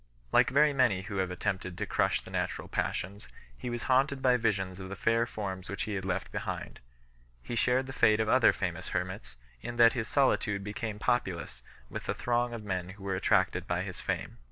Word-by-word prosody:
Like - - +5
very 145 +2 +4
many 120 -9 +3
who 100 -1 -5
have 95 -1 0
attempted 95 -1 -3
to - - -2
crush - - +1
the - - -12
natural - - -2
passions, 100 +3 -3 0.3
he 65 - -5
was 120 -1 -3
haunted 135 +2 +2
by 130 -1 +4
visions 95 -5 0
of 95 -1 -7
the 100 - -5
fair 115 +3 +2
forms 95 -4 -5
which 100 - -3
he 110 - -3
had 95 -2 -3
left 95 - -2
behind. - - -5 0.6
He - - -6
shared 125 +2 +2
the 130 - -7
fate 110 -4 +4
of 110 - +1
other 130 +2 +6
famous 90 -1 -3
hermits, 90 -10 -5 0.3
in 120 - -5
that 115 -1 +7
his 120 -3 -2
solitude 105 -7 +2
became 105 +1 -4
populous 90 - -1 0.3
with - - -6
the - - 0
throng 120 0 0
of 115 -2 -6
men 95 -3 -3
who 95 +1 -11
were 95 -1 -1
attracted 95 - +2
by - - 0
his - - -6
fame. - - -3
105 Hz, 205 wpm, -30 LUFS, 95-120 Hz, 0.6 s, that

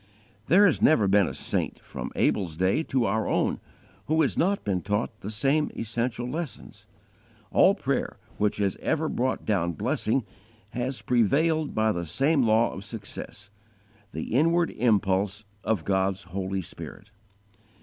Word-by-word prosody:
There 200 +4 +6
has 180 - +2
never 115 -10 +5
been 100 -1 +4
a - - -4
saint, - - -2
from - - -7
Abel's 85 -6 0
day 95 - +2
to 130 -6 0
our 110 +2 0
own, - - +1 0.5
who 160 +1 +3
has 140 - 0
not 195 +4 +1
been 95 -3 -1
taught 105 +3 -2
the 100 - -6
same 140 +7 +1
essential 115 +2 -2
lessons. 155 +1 -6 0.6
All - - +5
prayer - - -2 0.2
which 105 0 +1
has 100 -2 0
ever 160 0 0
brought 130 -2 -1
down 85 -5 +1
blessing 120 - 0 0.5
has 125 +2 -3
prevailed 150 +7 +2
by 110 0 +3
the 85 -4 -3
same 140 - +2
law 115 0 +3
of 95 - -7
success 105 -1 -9 0.6
_the 80 - -5
inward 165 +7 +3
impulse 105 -2 +1 0.2
of 110 -7 -1
God's 95 -1 0
Holy 95 +1 -3
Spirit. 100 +4 -10
110 Hz, 150 wpm, -26 LUFS, 95-135 Hz, 0.6 s, There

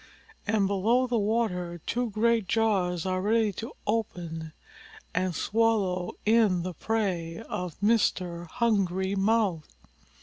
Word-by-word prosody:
And 205 -1 +2
below 215 +6 +2
the 240 -2 0
water 200 -5 -1
two 245 0 -1
great 225 0 +1
jaws 190 -7 +1
are 185 0 0
ready 215 +1 +2
to 225 +5 -6
open 170 -7 -3 0.6
and 180 -1 0
swallow 200 -4 +1
in 210 -5 +4
the 180 0 -4
prey 180 -4 -2
of 180 -3 -5
Mr. 185 -5 +1
Hungry 190 -3 0
Mouth. 195 - +1
200 Hz, 115 wpm, -28 LUFS, 180-225 Hz, 0.6 s, in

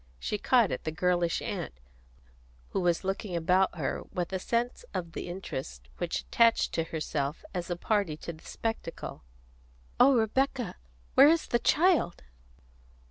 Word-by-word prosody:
She 210 - -3
caught 240 -4 +4
at - - -3
the 155 - -2
girlish 175 +1 +1
aunt, - - -4 1.0
who - - -1
was 175 0 +1
looking 195 -1 -3
about 180 +2 +2
her 150 - -2
with 180 +1 -3
a 190 - 0
sense 235 - -1
of 170 -2 -3
the - - -5
interest 130 - -6
which - - -1
attached 230 -1 +3
to 165 - 0
herself 155 -2 -3
as 180 -1 -3
a 175 - 0
party 195 -4 0
to 170 - -6
the 155 - -16
spectacle. 225 -7 -5 0.8
"Oh, 275 0 +7
Rebecca, 245 -1 0 0.4
where 280 - +8
is 330 0 +3
the 240 - +1
child?" 330 - +3
180 Hz, 150 wpm, -29 LUFS, 165-230 Hz, 1.0 s, where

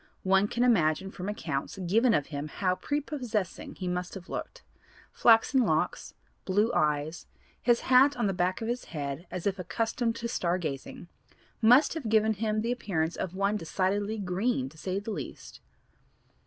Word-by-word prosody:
One 195 +1 +4
can 240 +3 0
imagine 190 -5 +2
from 185 +1 -5
accounts 140 -6 -3
given 215 +6 +3
of 145 - +1
him 145 +1 -3
how 185 +4 0
prepossessing 250 - -3
he 185 - -5
must 180 +1 -3
have 190 -1 -9
looked; - - -6 0.5
flaxen 235 +3 +5
locks, - - -1 0.3
blue 205 +4 +2
eyes, 150 +2 0 0.3
his 240 -1 +3
hat 265 +2 +5
on 235 - 0
the 195 - +1
back 180 +3 0
of - - -3
his 240 +1 -2
head 145 +2 -5
as 180 - -5
if 195 -1 0
accustomed 230 +5 -1
to 235 0 -4
star 180 -6 0
gazing, 155 0 -6 0.5
must 245 +6 +6
have 300 -9 -4
given 220 0 +3
him 215 +1 -1
the 230 +2 -1
appearance 175 -9 -1
of 185 0 -4
one 200 +2 +1
decidedly 200 +4 -1
'green,' 190 - -1
to 155 - -19
say 185 +2 -2
the 205 +3 -4
least. - - -7
200 Hz, 170 wpm, -29 LUFS, 180-230 Hz, 0.5 s, must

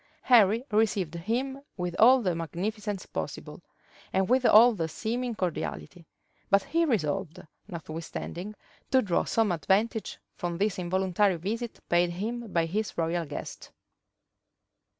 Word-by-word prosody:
Henry 230 -2 +5
received 205 -6 +1
him 245 +10 -2 0.2
with 180 -1 -3
all 250 +2 +7
the 180 -3 +1
magnificence 195 +5 -4
possible, - - -6 0.5
and 190 0 +1
with 255 +1 +3
all 235 +3 +8
the 165 -6 -2
seeming 235 +8 -3
cordiality; 175 -1 -4 0.4
but 200 -1 +4
he 335 +1 +1
resolved, 190 - -1 0.3
notwithstanding, 170 +3 -6 0.3
to 260 -1 +4
draw 180 -5 +1
some 225 -4 +1
advantage 205 +6 0 0.2
from 175 -2 -4
this 200 0 0
involuntary 185 +2 +1
visit 225 +7 -4
paid 175 0 +3
him 220 +5 -4
by 170 -1 +2
his 195 +2 -3
royal 165 +1 0
guest. 145 - -7
195 Hz, 130 wpm, -28 LUFS, 175-225 Hz, 0.5 s, all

